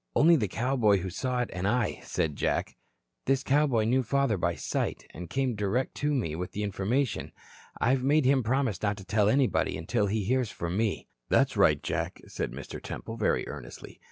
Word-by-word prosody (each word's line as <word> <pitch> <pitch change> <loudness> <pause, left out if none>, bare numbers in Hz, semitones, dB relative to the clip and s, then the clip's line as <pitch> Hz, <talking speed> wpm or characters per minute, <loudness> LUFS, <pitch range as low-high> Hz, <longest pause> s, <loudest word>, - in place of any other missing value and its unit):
"Only 165 +3 +6
the 115 -9 +1
cowboy 115 -1 +2
who 95 0 -4
saw 125 +6 -1
it 120 - -3
and 90 +1 -2
I," 120 0 0
said 75 -3 -2
Jack. - - -1 0.5
"This 135 0 +2
cowboy 140 -5 +3
knew 125 +4 +2
father 135 -1 +1
by 90 - 0
sight, - - -2
and 85 +1 -8
came 130 +5 0
direct 105 +5 -1
to 150 +1 0
me 105 - -1
with 90 +2 -5
the 105 - -2
information. 105 +6 -1 0.5
I've 130 +2 +2
made 145 +1 +3
him 135 0 +4
promise 125 -3 0
not 105 -1 0
to 95 - -10
tell 105 +2 +2
anybody 130 +2 +2
until 100 +6 0
he 105 +1 0
hears 125 +2 +1
from 85 -2 -4
me." 110 0 -1 0.2
"That's - - +3
right, - - +4
Jack," - - -2
said - - -4
Mr. 70 +3 -8
Temple, 115 - -6
very 105 - +1
earnestly. - - -9
115 Hz, 190 wpm, -28 LUFS, 100-130 Hz, 0.5 s, Only